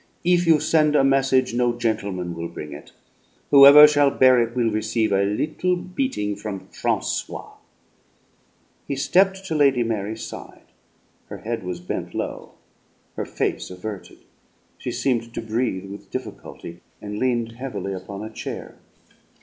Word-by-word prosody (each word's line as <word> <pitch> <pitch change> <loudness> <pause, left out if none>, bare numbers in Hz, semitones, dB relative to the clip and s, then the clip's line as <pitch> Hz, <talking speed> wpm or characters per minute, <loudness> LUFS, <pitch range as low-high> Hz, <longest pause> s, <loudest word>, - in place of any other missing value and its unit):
"If 175 0 +2
you 160 -2 +6
send 150 0 +2
a 140 - +5
message 135 -2 +2
no 120 0 +1
gentleman 100 -7 -2
will 85 0 -5
bring 75 -3 -8
it. 75 - -11 0.6
Whoever 140 +1 +10
shall 145 -1 +3
bear 130 -2 +5
it 115 +1 -2
will 120 -3 +1
receive 110 +1 0
a 100 - +3
little 155 - 0
beating 180 - -3
from 100 -2 -7
Francois." - - -3 1.4
He 140 - -2
stepped 190 +7 +2
to 165 - -3
Lady 140 -5 +3
Mary's 110 -1 -3
side. - - -10 0.6
Her - - -8
head 115 +1 -4
was 90 -1 -5
bent 90 - -5
low, - - -5 0.6
her - - -3
face - - -3
averted. 95 +2 -8 0.6
She - - -4
seemed 115 -3 -1
to - - -2
breathe 110 -4 -2
with 100 - -10
difficulty, 85 0 -8 0.2
and 105 0 -6
leaned 120 -3 0
heavily 115 -6 -5
upon 100 +2 -7
a 110 - -8
chair. - - -7
115 Hz, 145 wpm, -23 LUFS, 100-140 Hz, 1.4 s, Whoever